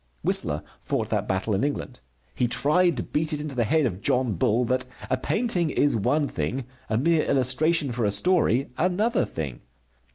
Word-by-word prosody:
Whistler 75 - +1 0.2
fought - - -2
that - - 0
battle 95 +3 -1
in 95 - 0
England. 145 - -3 0.3
He 125 - 0
tried 160 +5 +2
to - - -2
beat 155 +1 -2
it 150 - -2
into 150 -2 -5
the 120 -2 +1
head 155 +5 +2
of 100 -5 -3
John 125 -1 +1
Bull 110 +7 +1
that 125 +1 0 0.3
a - - +4
painting 180 - 0
is 145 -1 +2
one 145 +8 +1
thing, 120 - -3 0.2
a 110 - +1
mere 160 +5 +2
illustration 140 +3 +2
for 120 0 -2
a - - +2
story 135 - +2
another 195 +7 +1
thing. 70 -7 -6
130 Hz, 185 wpm, -25 LUFS, 115-155 Hz, 0.3 s, a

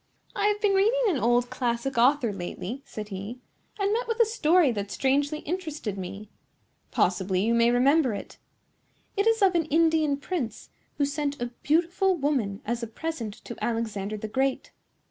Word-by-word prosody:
"I 410 0 +2
have 415 0 +1
been 410 -2 +2
reading 445 +6 +3
an 315 -8 0
old 240 +1 +2
classic 245 +1 -1
author 245 -1 +3
lately," 195 +6 -5
said 210 -1 -7
he, 205 +5 -6 0.4
"and 400 +1 +1
met 475 +2 -1
with 460 0 -2
a 465 - +7
story 355 - +3
that 205 -3 -4
strangely 280 - 0
interested 310 - -4
me. 195 +2 -7 0.6
Possibly 185 +1 +1
you 230 - +2
may 235 0 +4
remember 255 0 +3
it. - - -9 0.8
It 400 +2 +1
is 450 -2 +3
of 380 -1 +5
an 335 -2 +2
Indian 315 -2 +2
prince, 285 -6 -4 0.3
who 285 - +2
sent 285 0 -2
a 240 0 -3
beautiful 345 +5 +2
woman 265 - -1
as 235 +2 -2
a 230 - -3
present 230 -3 -5
to 235 - -7
Alexander 215 -3 -2
the 220 - -5
Great. 265 +4 -1
270 Hz, 170 wpm, -27 LUFS, 225-330 Hz, 0.8 s, a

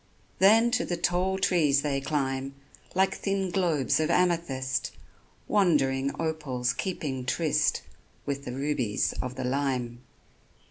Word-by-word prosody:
Then 225 +5 +6
to 245 - +1
the 175 - -3
tall 180 +2 0
trees 155 -7 +2
they 140 -2 -1
climb, 135 -2 -2 0.4
Like 190 +1 +3
thin 195 -2 -2
globes 170 -8 +1
of 155 0 0
amethyst, 165 -8 0 0.6
Wandering 140 -9 +2
opals 140 -6 -1
keeping 135 -4 -3
tryst 155 +4 +1 0.4
With 140 0 -3
the 125 - -5
rubies 135 -6 -1
of 130 0 -5
the 130 - -4
lime. 125 -2 -2
145 Hz, 125 wpm, -27 LUFS, 130-180 Hz, 0.6 s, Then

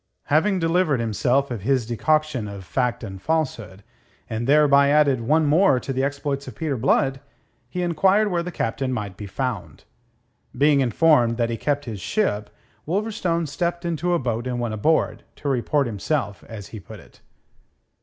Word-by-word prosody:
Having 190 +6 +3
delivered 165 -4 +1
himself 120 +5 0
of 115 -5 -4
his 130 +2 +1
decoction 145 0 0
of 100 -2 -8
fact 125 0 -1
and 95 -3 -7
falsehood, 115 -11 -2 0.4
and 115 +2 -3
thereby 140 -1 +5
added 145 -4 +3
one 155 +7 +2
more 150 -2 +4
to 135 - -4
the 130 +1 0
exploits 140 0 -2
of - - -8
Peter 155 -4 -2
Blood, 135 +2 +1 0.5
he 180 +6 -3
enquired 190 +5 +2
where 175 -1 +1
the 180 +1 -5
Captain 130 -1 -2
might 105 -6 -4
be 105 +1 -8
found. 120 -1 -4 0.7
Being 145 +1 +4
informed 125 -2 +3
that 115 -1 0
he - - -1
kept 145 +2 -1
his 110 -5 -6
ship, 105 - -1 0.4
Wolverstone 180 -3 -1
stepped 170 +3 -3
into 170 +1 0
a - - +3
boat 120 -3 -2
and 125 -1 -2
went 120 -2 -2
aboard, 155 +10 +1
to 145 - -7
report 140 +2 +1
himself, 115 0 -2
as 105 -4 -9
he 110 - -8
put 105 +2 -11
it. - - -19
135 Hz, 170 wpm, -23 LUFS, 115-160 Hz, 0.7 s, thereby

